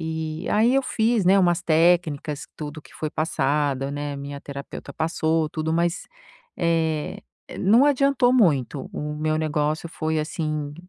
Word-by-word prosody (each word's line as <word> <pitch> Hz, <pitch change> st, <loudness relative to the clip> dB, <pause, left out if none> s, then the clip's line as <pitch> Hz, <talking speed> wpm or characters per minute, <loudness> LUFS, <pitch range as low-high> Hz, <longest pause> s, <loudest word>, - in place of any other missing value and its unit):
E 160 Hz, -1 st, -4 dB
aí 230 Hz, +5 st, +3 dB
eu 270 Hz, -, +3 dB
fiz, 225 Hz, -4 st, +1 dB
né, 195 Hz, +2 st, +5 dB
umas 175 Hz, -2 st, +3 dB
técnicas, 160 Hz, -3 st, +2 dB
tudo 150 Hz, 0 st, -6 dB
que -, -, -18 dB
foi 155 Hz, -, -4 dB
passado, 140 Hz, -3 st, 0 dB
né, 145 Hz, 0 st, -4 dB
minha 140 Hz, 0 st, -7 dB
terapeuta 140 Hz, 0 st, -8 dB
passou 160 Hz, 0 st, 0 dB
tudo, 155 Hz, +1 st, -3 dB
mas. 170 Hz, +2 st, 0 dB, 0.6 s
eh, 160 Hz, -3 st, 0 dB, 0.4 s
não 225 Hz, +8 st, +5 dB
adiantou 275 Hz, -3 st, +3 dB
muito. 145 Hz, -, +2 dB
O 150 Hz, 0 st, -4 dB
meu 155 Hz, +1 st, -1 dB
negócio 155 Hz, +1 st, -1 dB
foi 160 Hz, -1 st, -2 dB
assim 155 Hz, -2 st, -3 dB
160 Hz, 145 wpm, -24 LUFS, 150-175 Hz, 0.6 s, né